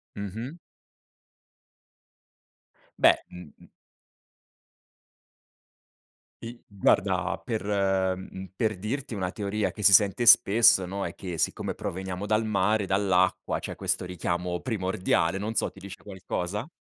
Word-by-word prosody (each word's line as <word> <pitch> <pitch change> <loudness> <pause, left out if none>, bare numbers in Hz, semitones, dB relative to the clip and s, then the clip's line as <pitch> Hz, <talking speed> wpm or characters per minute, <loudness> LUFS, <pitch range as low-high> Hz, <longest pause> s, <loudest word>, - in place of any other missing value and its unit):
Mh-mh. 110 - -6 2.4
Beh, - - +6
mh, 90 -4 -11
mh. - - -17 2.8
I 120 +1 -9
guarda 100 -2 +1
per 110 -2 -3 0.5
mhmm, 95 0 -9
per 110 -3 0
dirti 125 +7 -4
una 95 -3 -2
teoria 105 +1 -2
che 105 - -8
si 100 - +6
sente 100 +4 +4
spesso, 110 -4 +6
no, 100 +2 -4
è - - -6
che 90 -3 -6
siccome - - -1
proveniamo 95 +1 -5
dal 110 +1 +1
mare, 105 0 +1
dall'acqua, 95 -1 +1
c'è - - -6
questo - - -1
richiamo 90 0 -3
primordiale, 95 -5 0
non 105 +3 -4
so, - - 0
ti - - -15
dice 95 0 -11
qualcosa? 95 +3 -4
100 Hz, 120 wpm, -27 LUFS, 95-110 Hz, 2.8 s, Beh